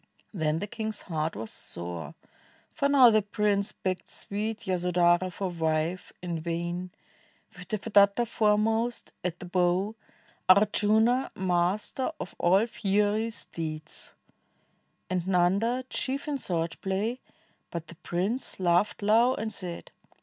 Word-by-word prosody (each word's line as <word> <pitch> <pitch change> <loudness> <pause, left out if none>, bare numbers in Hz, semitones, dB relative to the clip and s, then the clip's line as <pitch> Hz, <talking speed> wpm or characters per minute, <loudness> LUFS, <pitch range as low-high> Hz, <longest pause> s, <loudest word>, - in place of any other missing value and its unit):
Then 160 -4 0
the 200 - -2
king's 220 0 -4
heart 160 -2 -2
was 110 0 -5
sore, 85 -3 -7 0.6
for 280 - +1
now 260 -4 +8
the 215 0 +4
prince 205 0 0
Begged 185 -1 -3
sweet 215 +2 -4
Yasodhara 180 0 +2
for 190 0 -3
wife 160 +1 -1
— - - -48
in 170 -2 -2
vain. 170 +2 -3 0.7
With 180 0 -10
Devadatta 205 +1 +3
foremost 220 +2 +1
at 175 -1 -2
the 180 - -9
bow, 180 +3 +1 0.6
Ardjuna 215 +5 +4
master 185 - 0
of - - -6
all 185 +3 +5
fien, 210 0 +1
steeds. 155 -6 -5 1.0
And 185 -1 0
Xanda 195 +8 +2
chief 275 +3 -2
in 290 -2 -1
sword 170 -6 -2
play; 205 +6 -1 0.5
but 170 -1 -5
the 170 - -12
prince 195 +12 -2
Laughed 180 +3 +2
low 230 +5 +4
and 220 0 -4
said. 175 -3 -6
190 Hz, 130 wpm, -28 LUFS, 175-220 Hz, 1.0 s, now